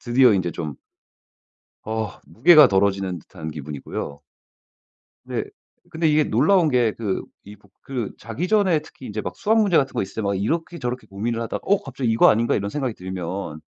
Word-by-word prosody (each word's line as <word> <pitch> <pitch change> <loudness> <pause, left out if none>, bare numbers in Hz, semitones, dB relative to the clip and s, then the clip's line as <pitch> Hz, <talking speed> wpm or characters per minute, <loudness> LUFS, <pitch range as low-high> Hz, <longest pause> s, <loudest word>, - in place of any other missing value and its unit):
드디어 120 -1 +4
인제 90 -3 0
좀 80 -4 -5 1.1
어 110 -2 -2
무게가 150 +3 +7
덜어지는 95 -3 +1
듯한 80 0 -9
기분이고요. 75 -1 -6 1.1
네. - - -2 0.5
근데 160 -1 +1
이게 150 0 +4
놀라운 160 - +3
게 120 -4 +2
그 105 -5 -2 0.2
이북 100 -1 -15
그 125 -6 -4
자기 125 +11 -4
전에 190 -7 +3
특히 150 -3 -15
인제 105 +1 -4
막 - - -6
수학 220 +2 +2
문제 195 -5 +3
같은 135 -2 +2
거 - - -1
있을 95 - -8
때 110 - -1
막 100 0 0
이렇게 165 - -2
저렇게 125 -3 -4
고민을 115 +4 -3
하다가 115 - -4
'어 200 +1 +3
갑자기 135 -3 -2
이거 115 - +5
아닌가?' 115 +2 +2
이런 100 0 -1
생각이 130 -6 -2
들면 90 -3 -5
115 Hz, 360 characters per minute, -23 LUFS, 95-150 Hz, 1.1 s, 무게가